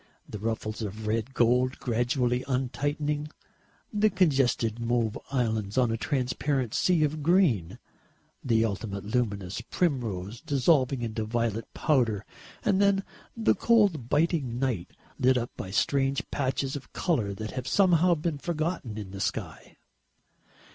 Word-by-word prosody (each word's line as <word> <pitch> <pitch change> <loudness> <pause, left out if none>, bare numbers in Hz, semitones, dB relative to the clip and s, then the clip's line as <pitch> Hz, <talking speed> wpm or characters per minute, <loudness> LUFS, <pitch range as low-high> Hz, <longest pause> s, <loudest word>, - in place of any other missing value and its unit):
The 105 - -7
ruffles 110 0 -3
of 105 +1 -5
red 115 +4 -1
gold 125 +2 +3
gradually 125 +1 0
untightening, 145 +3 -1 0.6
the 210 +1 +3
congested 135 - +2
mauve 115 -2 0
islands 110 -5 -1
on 125 -3 +3
a - - 0
transparent 130 0 -1
sea 175 -4 +3
of 150 +1 -1
green, 145 - +2 0.7
the 115 -3 +3
ultimate 100 -2 -4
luminous 105 -3 -1
primrose 115 - -2
dissolving 135 -2 +2
into 110 -1 -2
violet 115 0 -2
powder 120 - +1 0.4
and 195 -1 +3
then 200 -1 +3 0.3
the 225 - +3
cold 200 - +2
biting 145 -5 +1
night 125 -9 -1 0.3
lit 130 0 +4
up 120 0 -2
by 95 - -6
strange 135 +6 +1
patches 135 0 -1
of 140 - -8
colour 115 - 0
that 110 +1 -5
have 130 -1 -5
somehow 180 +1 +4
been 155 -1 -2
forgotten 155 - -3
in 100 -3 -6
the 100 0 -6
sky. - - -4
125 Hz, 135 wpm, -28 LUFS, 110-150 Hz, 0.7 s, lit